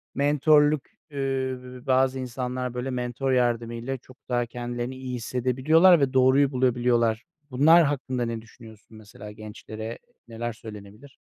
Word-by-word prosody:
mentörlük 145 +1 +3 0.2
ııı, 130 -2 -4
bazı 130 0 +2
insanlar, 125 0 -4
böyle, 125 +2 -4
mentör 125 +1 -2
yardımıyla 120 +1 -1
çok 130 +1 -18
daha 120 -1 +1
kendilerini 120 +1 -5
iyi 130 -1 -6
hissedebiliyorlar 130 +9 +3
ve 135 -1 +1
doğruyu 130 +2 +4
bulabiliyorlar. 120 -3 +1 0.3
Bunlar 160 +6 +6
hakkında 130 -4 -2
ne 115 -1 -4
düşünüyorsun 110 -2 -16
mesela, 105 0 -11
gençlere 110 +1 -8 0.3
neler 115 0 -5
söylenebilir? 110 +3 -12
125 Hz, 120 wpm, -25 LUFS, 115-135 Hz, 0.3 s, Bunlar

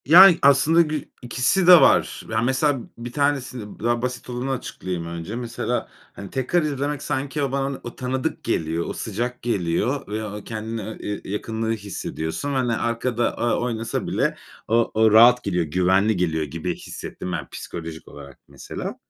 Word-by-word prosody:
Yani 175 +4 +9
aslında 145 +4 +5
gü 155 -3 -1 0.2
ikisi 125 +9 +1
de 180 -2 +10
var. - - +3
Yani 110 +1 0
mesela 135 +2 +2 0.2
1 120 +1 -7
tanesini, 130 -6 -2
daha 120 +1 0
basit 125 0 -4
olanı 125 +2 -3
açıklayayım 95 -9 -4
önce. 85 +5 -6
Mesela, 120 -1 -3 0.3
hani 100 -1 -9
tekrar 135 +7 +1
izlemek 145 -1 -2
sanki 140 +1 -2
o 135 - -1
bana 135 0 -2
o 120 - -7
tanıdık 130 +4 -3
geliyor, 80 -5 -1
o - - -3
sıcak 120 +4 -4
geliyor 115 +5 -1
ve 110 +1 -3
o 105 0 -7
kendini 110 0 -5
e 110 +2 -7
eee, 105 0 -3
yakınlığı 110 +2 -2
hissediyorsun 100 - -4
ve, - - -1
hani, 125 -3 +1
arkada, 120 +1 -1
ııı, 120 - +2
oynasa 115 -1 -2
bile - - 0 0.3
o 115 +1 +2
o 110 0 +4
rahat 120 +3 +7
geliyor, 90 -4 0
güvenli 95 +6 +2
geliyor 80 -3 0
gibi 80 +2 -4
hissettim 90 - -7
ben - - -4
psikolojik 80 -1 -7
olarak 70 -2 -12
mesela. - - -6
120 Hz, 165 wpm, -23 LUFS, 100-135 Hz, 0.3 s, de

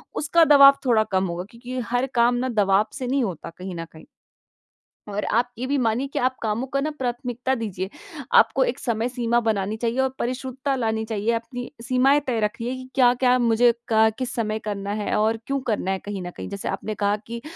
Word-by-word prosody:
उसका 330 +3 +3
दवाब 275 0 +9
थोड़ा 230 -4 +4
कम 190 0 +2
होगा 175 +1 -4
क्योंकि 245 +2 -6
हर 245 +2 +1
काम 240 +1 +4
ना 255 +1 -1
दबाव 195 +2 +3
से 255 - -4
नहीं 265 0 +1
होता 170 -5 -4
कहीं 185 0 -6
न 165 0 -5
कहीं। 160 - -14 1.0
और 205 0 -3
आप 240 +2 +2
ये 250 - -3
भी 285 +1 +1
मानिए 240 +3 0
कि - - 0
आप 255 +1 +1
कामों 220 +3 -1
का 275 +1 -1 0.2
प्राथमिकता 245 +1 -2
दीजिए। 195 -5 -4 0.5
आपको - - +5
एक - - -2
समय 235 -1 -1
सीमा 240 -1 +1
बनानी 215 -2 -1
चाहिए 235 +3 -1
और 265 - +1
परिशुद्धता 260 +2 -2
लानी 220 -3 -1
चाहिए 220 0 -1
अपनी 235 +2 -5
सीमाएँ 260 +4 +3
तय 240 -3 0
रखिए 230 +4 -2
कि 255 0 -9
क्या-क्या 250 0 +4
मुझे 235 0 +4 0.2
क 220 0 +5
किस 255 -1 -2
समय 215 -2 -1
करना 200 -2 -4
है? 210 0 -2
और 220 +1 +2
क्यों 275 0 0
करना 210 -4 0
है 190 - -1
कहीं 200 -2 -4
न 175 - -6
कहीं? - - -6
जैसे 200 0 -5
आपने 210 +2 -4
कहा 205 0 +1
कि 235 0 -6
235 Hz, 205 wpm, -23 LUFS, 210-255 Hz, 1.0 s, दवाब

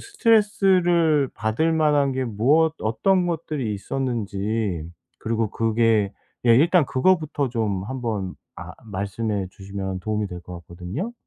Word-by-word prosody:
스트레스를 185 - +3
받을 115 +9 0
만한 150 -3 +3
게 130 0 -1
무엇 140 +9 +2
어떤 180 - +1
것들이 155 -8 -2
있었는지 105 -6 -3 0.3
그리고 115 -1 -1
그게 110 -2 +1 0.3
예 115 0 +7
일단 165 +1 +4
그거부터 150 -1 +1
좀 105 -5 -1
한번 115 -7 -3 0.2
아 - - -8
말씀해 100 0 -3
주시면 95 -1 -6
도움이 105 +2 -2
될 90 -1 -7
것 90 - -10
같거든요. 90 - -6
115 Hz, 275 characters per minute, -23 LUFS, 100-155 Hz, 0.3 s, 예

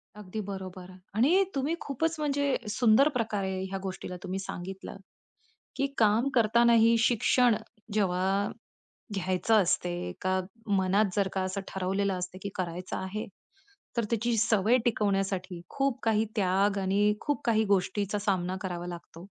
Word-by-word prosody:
अगदी 210 0 -7
बरोबर 185 -2 -7 0.2
आणि 310 - +4
तुम्ही 280 +5 0
खूपच 320 +4 -1
म्हणजे 285 -1 0 0.2
सुंदर 225 +5 +5
प्रकारे 205 -6 -1
ह्या 195 - -3
गोष्टीला 185 -1 -5
तुम्ही 190 0 -3
सांगितलं, 190 +1 -7 0.8
की 275 +1 +1
काम 225 +4 +3
करतानाही 230 0 +5
शिक्षण 235 +1 +3 0.4
जेव्हा 195 0 +1 0.7
घ्यायचं 185 +2 +1
असते, 175 - -1
का 185 0 +1 0.4
मनात 190 +2 +3
जर 200 -2 +2
का 190 - -1
असं 185 +1 -2
ठरवलेलं 190 0 -1
असते, 180 +1 -5
की 200 - -3
करायचं 180 -1 -4
आहे, 190 +3 -4 0.7
तर 235 - +1
त्याची 230 0 +1
सवय 220 +2 +3
टिकवण्यासाठी 195 -5 0
खूप 275 -2 0
काही 220 -1 +2
त्याग 195 +1 +2
आणि 200 +2 +2
खूप 290 -1 -1
काही 220 -2 +3
गोष्टीचा 200 +2 0
सामना 185 -3 -1
करावा 175 -2 -4
लागतो. 175 0 -9
200 Hz, 135 wpm, -29 LUFS, 185-230 Hz, 0.8 s, सुंदर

